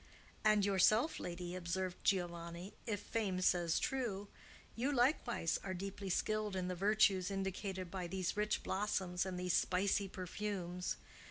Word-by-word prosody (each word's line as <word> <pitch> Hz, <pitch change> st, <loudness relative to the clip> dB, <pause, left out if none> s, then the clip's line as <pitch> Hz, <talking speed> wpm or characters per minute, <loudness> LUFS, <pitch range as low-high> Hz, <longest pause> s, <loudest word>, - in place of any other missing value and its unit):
"And 215 Hz, -2 st, +5 dB
yourself, 215 Hz, -, +4 dB
lady," 175 Hz, 0 st, -4 dB
observed 185 Hz, +1 st, -3 dB
Giovanni, 175 Hz, 0 st, -1 dB
"if 205 Hz, -3 st, -1 dB
fame 205 Hz, -4 st, -1 dB
says 175 Hz, -2 st, +3 dB
true,—you 235 Hz, +2 st, -3 dB
likewise 245 Hz, -, +2 dB
are 190 Hz, -1 st, -3 dB
deeply 195 Hz, +1 st, -5 dB
skilled 215 Hz, +2 st, 0 dB
in 185 Hz, -1 st, -1 dB
the 180 Hz, -, -1 dB
virtues 195 Hz, -1 st, +3 dB
indicated 190 Hz, -2 st, -3 dB
by 185 Hz, -2 st, -3 dB
these 185 Hz, 0 st, -2 dB
rich 210 Hz, 0 st, 0 dB
blossoms 190 Hz, -2 st, 0 dB
and 180 Hz, -1 st, -3 dB
these 180 Hz, -1 st, 0 dB
spicy 195 Hz, +2 st, +2 dB
perfumes. 185 Hz, -1 st, -3 dB
190 Hz, 135 wpm, -37 LUFS, 180-210 Hz, -, And